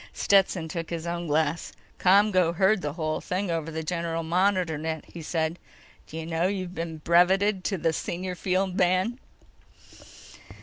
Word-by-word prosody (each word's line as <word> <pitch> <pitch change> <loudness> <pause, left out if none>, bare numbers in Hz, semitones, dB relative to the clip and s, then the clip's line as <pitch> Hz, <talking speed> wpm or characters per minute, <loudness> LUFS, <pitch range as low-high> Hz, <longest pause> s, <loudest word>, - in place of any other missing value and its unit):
Stetson 190 -4 +2
took 165 0 -5
his 170 -1 -4
own 170 0 -3
glass. 155 +1 0 0.3
"ComGO 185 -3 +4
heard 190 +2 +3
the 145 -2 -3
whole 155 -1 -2
thing 185 0 -2
over 165 -1 -2
the 160 0 -4
general 165 0 -2
monitor 180 0 +1
net," 160 +1 -4
he 170 - -10
said. 160 +1 -2 0.5
"D'you 160 +1 -6
know 165 +2 0
you've 185 -2 -3
been 165 -2 -5
breveted 185 +4 +3
to 170 -5 0
senior 180 +3 -3
field 185 +1 -1
man?" 185 +7 +2
170 Hz, 145 wpm, -26 LUFS, 160-185 Hz, 0.5 s, ComGO